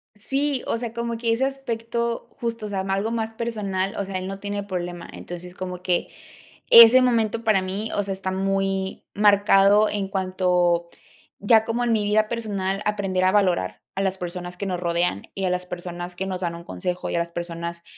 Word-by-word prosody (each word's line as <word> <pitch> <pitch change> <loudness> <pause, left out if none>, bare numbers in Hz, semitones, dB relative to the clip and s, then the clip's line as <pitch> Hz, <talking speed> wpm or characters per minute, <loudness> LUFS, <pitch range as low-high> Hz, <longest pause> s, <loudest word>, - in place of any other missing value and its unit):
Sí, 270 +5 -1
o - - 0
sea, 230 -1 -5
como 235 -1 -3
que 230 0 +1
ese 250 +4 +1
aspecto, 235 -3 -3
justo, 230 -2 -3
o - - -7
sea, 195 -2 -1
algo 195 +3 -1
más 225 -1 -2
personal, 205 -4 -2
o 200 - -2
sea, 190 -1 -3
él 185 - -5
no 195 0 -5
tiene 205 0 -3
problema. 175 -3 -5
Entonces, 175 +1 -9
como 180 -1 -6
que 180 -1 0 0.6
ese 235 +2 +10
momento, 230 -2 +1
para 215 -4 +3
mí, 195 +4 -3
o 205 - +1
sea, 195 - -3
está 190 0 -4
muy 195 0 -1
marcado 205 0 +5
en 200 -2 -2
cuanto 180 -2 +1 0.5
ya 220 +2 +4
como 235 +2 -1
en 235 -1 +2
mi 215 -2 +1
vida 215 +1 +2
personal 200 -4 -2
aprender 195 -3 0
a 185 - +4
valorar 180 - +1
a 195 - -1
las 190 0 0
personas 180 0 -6
que 200 - -4
nos 180 -2 -2
rodean 170 - 0
y 195 - -2
a 185 - +1
las 180 0 -1
personas 175 0 -6
que 190 - -3
nos 185 -1 -4
dan 170 -1 -2
un 170 - -9
consejo, 180 0 -4
y - - -2
a - - +2
las 170 0 -3
personas, 170 0 -5
195 Hz, 205 wpm, -24 LUFS, 180-220 Hz, 0.6 s, ese